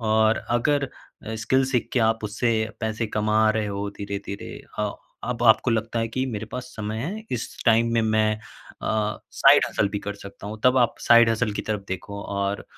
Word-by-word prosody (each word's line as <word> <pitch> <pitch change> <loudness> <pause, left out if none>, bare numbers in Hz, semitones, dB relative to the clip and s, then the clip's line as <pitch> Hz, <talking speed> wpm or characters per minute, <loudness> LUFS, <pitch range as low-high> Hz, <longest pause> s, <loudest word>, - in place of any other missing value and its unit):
और 110 0 +3
अगर 140 +4 +2 0.5
स्किल 130 +4 +2
सीख 130 -2 0
के 125 - +2
आप 115 -1 -1
उससे 115 +3 0 0.3
पैसे 110 +1 -1
कमा 110 +1 +2
रहे 110 -1 0
हो 100 0 -3
धीरे-धीरे 100 0 -5 0.2
अ, 105 -1 0 0.3
अब 120 -1 -3
आपको 115 +2 +5
लगता 115 +1 -1
है 115 0 0
कि 130 +3 -1
मेरे 110 -1 -4
पास 125 +2 -6
समय 105 0 -3
है, 200 - -4
इस 120 - -4
टाइम 115 0 +4
में 115 -1 +3
मैं 110 0 +2 0.5
अ, 105 -1 0
साइड - - +6
हसल 105 - +1
भी 105 +1 -3
कर 105 0 -5
सकता 100 0 -11
हूँ 110 +1 -6
तब 125 +1 +5
आप 120 -1 +3
साइड 120 -1 +6
हसल 110 -1 0
की - - -3
तरफ 105 -2 -3
देखो 100 +2 -5
और 100 0 -2
110 Hz, 195 wpm, -24 LUFS, 105-120 Hz, 0.5 s, साइड